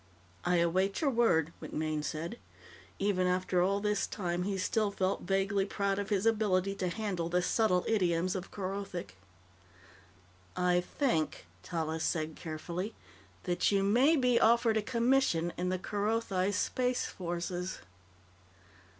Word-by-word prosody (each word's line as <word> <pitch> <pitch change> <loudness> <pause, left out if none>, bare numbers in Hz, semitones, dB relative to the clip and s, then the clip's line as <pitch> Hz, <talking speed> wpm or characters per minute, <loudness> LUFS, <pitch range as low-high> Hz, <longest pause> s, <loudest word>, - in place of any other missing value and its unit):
"I 180 - +2
await 185 +3 +2
your 285 -3 +2
word," 165 - +2
MacMaine 155 -1 -2
said. 165 +10 -4 0.6
Even 195 -2 +1
after 180 0 +1
all 195 +2 +2
this 210 -1 0
time, 175 -3 -2
he 195 +1 -1
still 205 +2 +1
felt 190 -1 -1
vaguely 195 +1 +1
proud 200 0 -1
of 200 - -3
his 205 -1 +1
ability 200 -4 +2
to 185 - -1
handle 185 -4 -2
the 180 +1 +1
subtle 185 -3 +2
idioms 180 -4 +1
of 190 -1 -5
Kerothic. 195 - -5 1.4
"I 180 0 +3 0.2
think," 235 - 0 0.2
Tallis 160 -2 -3
said 155 -1 -1
carefully, 170 +6 -5 0.5
"that 175 +1 +1
you 195 -1 +2
may 250 +11 +4
be 250 -4 +3
offered 230 -1 +4
a - - +2
commission 235 -7 +1
in 180 +1 -1
the 185 - 0
Kerothi 205 -1 0
Space 250 +5 0
Forces." 175 +1 -4
190 Hz, 135 wpm, -31 LUFS, 175-210 Hz, 1.4 s, may